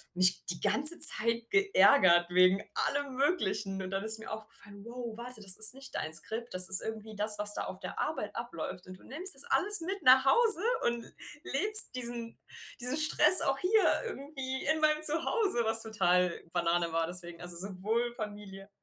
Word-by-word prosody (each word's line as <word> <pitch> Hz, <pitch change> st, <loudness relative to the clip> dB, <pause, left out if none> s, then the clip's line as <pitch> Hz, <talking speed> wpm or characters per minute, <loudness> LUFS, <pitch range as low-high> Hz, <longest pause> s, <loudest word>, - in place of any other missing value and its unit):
mich 185 Hz, 0 st, +1 dB
die 175 Hz, -1 st, -3 dB
ganze 300 Hz, +5 st, +4 dB
Zeit 230 Hz, -5 st, +4 dB
geärgert 195 Hz, -, -3 dB
wegen 185 Hz, +2 st, -3 dB
allem 280 Hz, -2 st, -9 dB
Möglichen. 210 Hz, -, -7 dB
Und 185 Hz, 0 st, -13 dB
dann 195 Hz, +1 st, -9 dB
ist 220 Hz, 0 st, +3 dB
mir 220 Hz, -, -16 dB
aufgefallen: 215 Hz, -2 st, -17 dB
„Wow, 235 Hz, -1 st, -14 dB
warte, 240 Hz, -1 st, -7 dB
das 195 Hz, -2 st, +2 dB
ist 220 Hz, +2 st, +6 dB
nicht 270 Hz, 0 st, -16 dB
dein 155 Hz, -, -10 dB
Skript. 225 Hz, +8 st, +3 dB
Das 185 Hz, 0 st, +7 dB
ist 190 Hz, -, +8 dB
irgendwie 220 Hz, -1 st, -13 dB
das, 210 Hz, +1 st, +4 dB
was 210 Hz, 0 st, +1 dB
da -, -, -10 dB
auf -, -, -15 dB
der -, -, -14 dB
Arbeit -, -, -10 dB
abläuft. 180 Hz, -, -13 dB
Und 185 Hz, 0 st, -17 dB
du -, -, -27 dB
nimmst 360 Hz, +8 st, +6 dB
das -, -, 0 dB
alles 415 Hz, 0 st, +2 dB
mit 385 Hz, +4 st, -11 dB
nach 260 Hz, +1 st, -1 dB
Hause 435 Hz, -, +3 dB, 0.2 s
und 235 Hz, -1 st, -8 dB
l -, -, -25 dB, 0.3 s
lebst 420 Hz, +8 st, +3 dB
diesen 235 Hz, -2 st, -10 dB, 0.4 s
diesen 250 Hz, +4 st, -4 dB
Stress 310 Hz, +4 st, +5 dB
auch 270 Hz, 0 st, -6 dB
hier 420 Hz, +6 st, -4 dB
irgendwie 270 Hz, -, -13 dB
in 315 Hz, +1 st, -6 dB
meinem 305 Hz, 0 st, -5 dB
Zuhause,“ 320 Hz, -, 0 dB
was 225 Hz, 0 st, +3 dB
total 180 Hz, -5 st, -6 dB
Banane 170 Hz, -1 st, -7 dB
war. 165 Hz, 0 st, -6 dB
Deswegen 175 Hz, -1 st, -2 dB
also, 175 Hz, 0 st, -3 dB
sowohl 205 Hz, +6 st, -7 dB
Familie 205 Hz, -3 st, -15 dB
225 Hz, 185 wpm, -23 LUFS, 190-280 Hz, 0.4 s, ist